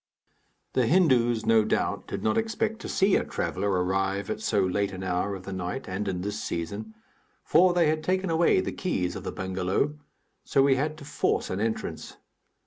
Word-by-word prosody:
The 125 Hz, -3 st, +2 dB
Hindus, 125 Hz, -10 st, +3 dB
no 110 Hz, -1 st, +5 dB
doubt, -, -, -1 dB
did -, -, -5 dB
not 110 Hz, -, +2 dB
expect 220 Hz, 0 st, -1 dB
to -, -, -7 dB
see 195 Hz, 0 st, +3 dB
a -, -, +2 dB
traveller 100 Hz, +2 st, -2 dB
arrive 95 Hz, +1 st, 0 dB
at -, -, -4 dB
so 105 Hz, -2 st, +1 dB
late 95 Hz, +2 st, 0 dB
an 95 Hz, 0 st, -6 dB
hour 95 Hz, +2 st, -1 dB
of 95 Hz, -, -9 dB
the 100 Hz, -, -6 dB
night 90 Hz, +7 st, -4 dB
and 100 Hz, +2 st, -3 dB
in 90 Hz, -2 st, -2 dB
this 105 Hz, +2 st, -3 dB
season, 100 Hz, +7 st, -4 dB, 0.5 s
for 180 Hz, +3 st, +5 dB
they 170 Hz, -3 st, +4 dB
had 155 Hz, 0 st, 0 dB
taken 185 Hz, +1 st, 0 dB
away 170 Hz, +3 st, +4 dB
the -, -, -3 dB
keys 95 Hz, -, -2 dB
of -, -, -6 dB
the -, -, -4 dB
bengalow, 95 Hz, +10 st, -1 dB, 0.4 s
so 135 Hz, -, +3 dB
we 135 Hz, -1 st, +4 dB
had 150 Hz, +3 st, -1 dB
to 145 Hz, -, -11 dB
force -, -, -1 dB
an 95 Hz, -, -2 dB
entrance. 110 Hz, +1 st, -3 dB
110 Hz, 195 wpm, -27 LUFS, 95-155 Hz, 0.5 s, no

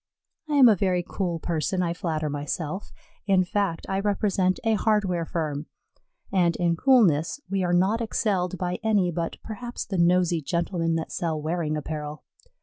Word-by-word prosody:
I 295 Hz, -, +1 dB
am 270 Hz, -3 st, +8 dB
a 220 Hz, -, +6 dB
very 180 Hz, -2 st, +1 dB
cool 180 Hz, -4 st, -2 dB
person, 170 Hz, +3 st, -1 dB
I 170 Hz, -1 st, 0 dB
flatter 160 Hz, -3 st, -2 dB
myself; 150 Hz, +5 st, -4 dB, 0.4 s
in 190 Hz, -2 st, +4 dB
fact, 195 Hz, -3 st, -1 dB
I 195 Hz, -, -1 dB
represent 195 Hz, -2 st, +1 dB
a 225 Hz, -1 st, +2 dB
hardware 205 Hz, -6 st, +1 dB
firm, 155 Hz, -3 st, -3 dB, 0.7 s
and, 175 Hz, -3 st, +3 dB
in 170 Hz, -1 st, +1 dB
coolness, 190 Hz, -, +3 dB
we 195 Hz, -1 st, +1 dB
are 175 Hz, -, 0 dB
not 190 Hz, +6 st, +2 dB
excelled 190 Hz, -5 st, 0 dB
by 180 Hz, -1 st, -2 dB
any 205 Hz, -5 st, +2 dB
but 165 Hz, 0 st, -3 dB
perhaps 240 Hz, +2 st, -6 dB
the 190 Hz, -4 st, -3 dB
nosy 175 Hz, -1 st, +3 dB
gentlemen 170 Hz, +1 st, -1 dB
that 160 Hz, -, -3 dB
sell 160 Hz, -3 st, -2 dB
wearing 155 Hz, 0 st, -1 dB
apparel. 150 Hz, 0 st, -5 dB
180 Hz, 160 wpm, -25 LUFS, 165-195 Hz, 0.7 s, am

